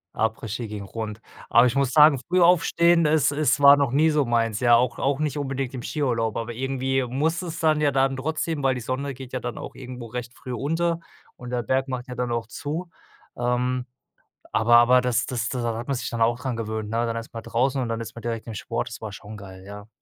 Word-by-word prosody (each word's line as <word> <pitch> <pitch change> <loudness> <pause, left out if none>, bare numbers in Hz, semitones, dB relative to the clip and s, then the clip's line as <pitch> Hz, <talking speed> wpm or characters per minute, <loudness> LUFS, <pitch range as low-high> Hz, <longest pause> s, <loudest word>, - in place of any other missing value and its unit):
Après-Ski 110 +1 -2
ging 105 -1 -6
rund. 110 +1 -6 0.3
Aber 120 +1 +6
ich 120 - -1
muss 135 -2 +1
sagen, 150 -1 +6
früh 180 +1 +2
aufstehen, 170 0 +4
es 150 -2 +3
es 145 -1 +1
war 140 0 +8
noch 140 -3 +1
nie 155 +4 +4
so 150 -2 +2
meins, 115 -2 0
ja, 120 -2 +5
auch 120 0 +1
auch 135 0 +1
nicht 150 -2 -1
unbedingt 135 -2 -3
im 125 - -5
Skiurlaub, 115 -7 -1
aber 115 +1 -4
irgendwie 135 +1 -1
musst 150 +8 -1
du's 165 -2 -6
dann 155 -1 +2
ja 145 - +3
dann 135 0 +2
trotzdem, 155 +2 -2
weil 130 -1 +2
die 125 - -5
Sonne 135 +3 -3
geht 130 -1 -10
ja 130 - -1
dann 120 -1 -5
auch - - -7
irgendwo 125 -2 -8
recht 120 +1 -6
früh 130 -2 -9
unter 165 +6 0 0.4
und 125 -1 -9
der 120 -1 -1
Berg 130 +4 0
macht 130 0 -5
ja 125 - -7
dann 125 -1 -2
auch 115 -1 -1
zu. 160 +7 -5 0.5
Ähm, 125 +1 0 0.7
aber 115 +2 +5
aber 125 +2 +6
das 125 -1 0
das 120 -2 -2
da 120 -3 -2
hat 120 - -5
man 135 - 0
sich - - -4
dann 115 -1 -4
auch 115 +1 +2
dran 130 -3 -3
gewöhnt, 110 -1 -4
ne? 115 +1 0
Dann 115 - -2
erst 115 0 -7
mal 115 - -5
draußen 130 +4 0
und 120 - -2
dann 115 0 -2
ist 115 - -7
man 120 - -8
direkt 115 0 -4
im 115 - -6
Sport, - - -3
das - - -9
war 110 -2 -6
schon 105 +1 -9
geil, 95 -2 -11
ja. 105 +1 -10
125 Hz, 240 wpm, -24 LUFS, 115-140 Hz, 0.7 s, war